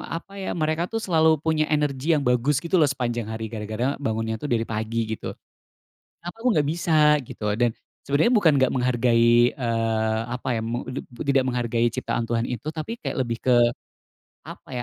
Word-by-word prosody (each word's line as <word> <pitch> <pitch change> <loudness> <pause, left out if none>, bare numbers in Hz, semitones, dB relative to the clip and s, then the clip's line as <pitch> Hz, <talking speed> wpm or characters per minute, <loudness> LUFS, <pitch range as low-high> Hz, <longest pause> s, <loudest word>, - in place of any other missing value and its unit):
apa 185 +4 -8
ya, - - -3
mereka 155 +2 +1
tuh 225 - -1
selalu 160 -3 +4 0.2
punya 155 -1 +2
energi 145 -1 -1
yang 145 - -2
bagus 125 +3 +2
gitu 170 +2 0
loh, 150 - +4
sepanjang 120 -4 -2
hari 110 0 -4
gara-gara 110 +5 -2
bangunnya 110 -1 -1
tuh 150 - -4
dari 115 -1 0
pagi 110 +2 -2
gitu. - - -6 0.9
Kenapa 175 +5 -8
aku 250 - +2
enggak 150 -2 +2
bisa, 170 -1 -2 0.4
gitu, - - -8 0.2
dan 120 -1 +4 0.4
sebenarnya 145 - +3
bukan 180 -8 +5
enggak 130 -2 +2
menghargai 120 -1 +3
eee, 115 -3 0
apa 125 +1 -5
ya, - - -1
meng 120 +2 -3
ti - - -3 0.3
tidak 135 -1 +3
menghargai 120 -2 0
ciptaan 115 0 -2
Tuhan 115 0 -1
itu, 125 +5 -5
tapi 165 +9 -5
kayak - - -4
lebih 115 -3 -2
ke 130 - +3 0.9
apa - - -11
125 Hz, 180 wpm, -24 LUFS, 115-150 Hz, 0.9 s, bukan